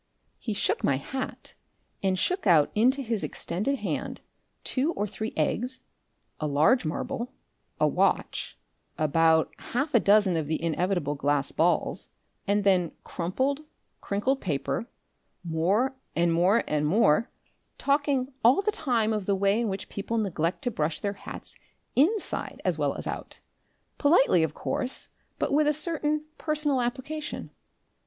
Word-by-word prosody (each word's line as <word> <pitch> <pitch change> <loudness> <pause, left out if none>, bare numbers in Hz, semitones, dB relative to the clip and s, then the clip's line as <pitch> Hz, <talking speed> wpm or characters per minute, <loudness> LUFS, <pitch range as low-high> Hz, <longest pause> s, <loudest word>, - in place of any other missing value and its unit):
He 220 -4 -3
shook - - 0
my 140 - +3
hat, 260 - -6 0.5
and 190 -1 +1
shook 365 - 0
out 155 -5 +5
into 255 +6 +3
his 225 -4 -1
extended 210 +11 -1
hand - - -4 0.4
two 285 +6 0
or 205 - -1
three 220 +2 -4
eggs, 250 +2 -1 0.6
a 155 - -1
large 155 - +3
marble, 245 - -3 0.5
a - - +4
watch, - - 0 0.4
about 160 +1 +3
half 285 +5 -2
a 235 - +6
dozen 205 -3 +4
of 155 -2 -2
the 155 - -1
inevitable 170 -2 0
glass 145 0 0
balls, 175 +2 +1 0.4
and 205 +1 +2
then 185 -4 +3
crumpled, 260 - -1 0.4
crinkled 255 +7 0
paper, 160 +7 -2 0.6
more 185 +11 +1 0.2
and 170 0 +3
more 185 +7 +4
and 150 0 +1
more, 195 - +3 0.5
talking 280 -2 +1
all 255 - +5
the 425 - +2
time 230 - +1
of 210 -3 -3
the 200 - +3
way 200 +3 +2
in 230 - 0
which 195 0 -4
people 230 +3 -3
neglect 180 - -1
to 245 - 0
brush 155 -5 -1
their 200 -1 -2
hats 195 - -10 0.4
INSIDE 375 - +1
as - - +2
well - - +1
as - - -6
out, - - -6 0.6
politely, 285 - +5
of 160 -2 -1
course, 260 0 -3 0.3
but - - -1
with 300 +1 +4
a 300 - +3
certain 305 -1 0
personal 300 -4 +1
application. 275 +5 -4
210 Hz, 145 wpm, -27 LUFS, 170-270 Hz, 0.6 s, a